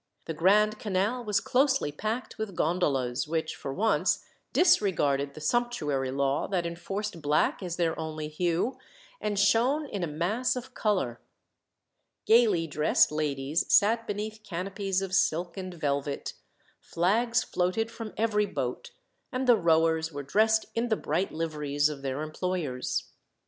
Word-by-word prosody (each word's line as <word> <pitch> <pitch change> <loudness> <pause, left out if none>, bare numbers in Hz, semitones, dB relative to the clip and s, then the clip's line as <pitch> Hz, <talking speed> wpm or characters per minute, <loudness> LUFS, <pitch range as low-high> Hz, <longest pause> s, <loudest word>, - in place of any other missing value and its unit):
The 165 - -3
Grand 210 +6 +3
Canal 210 +4 -1
was 210 -3 +1
closely 265 - +2
packed 220 +10 -4
with 215 -4 -4
gondolas, 140 -8 0
which, 160 0 -2
for 135 - -6
once, 215 +10 +1 0.3
disregarded 150 - +2
the 155 - -9
sumptuary 150 - 0
law 135 +1 0
that 180 -3 -1
enforced 175 +2 -4
black 150 +6 +1
as 175 -3 -4
their 170 -2 0
only 155 -1 -4
hue, 175 +9 -1 0.4
and 205 -1 -1
shone 240 +9 +3
in 200 -9 -4
a - - 0
mass 180 +13 0
of 250 +1 -7
colour. 185 - -1 1.0
Gaily 220 -7 +4
dressed 150 -1 +3
ladies 150 0 -1
sat 225 +2 +4
beneath 215 +1 -4
canopies 195 +1 -2
of 190 -1 -5
silk 175 -2 +1
and 185 -2 -5
velvet; 140 -2 -2 0.5
flags 230 +8 +1
floated 185 +6 -1
from 225 -2 -7
every 210 -2 +1
boat, 485 - -4 0.4
and 260 0 -1
the 245 -2 +7
rowers 160 -3 +2
were 145 -1 -5
dressed 220 +9 +3
in 235 +1 -1
the 220 - +3
bright 175 +6 -1
liveries 150 -2 0
of 145 -2 -7
their 135 +2 -3
employers. 155 -5 -3
180 Hz, 145 wpm, -28 LUFS, 155-215 Hz, 1.0 s, the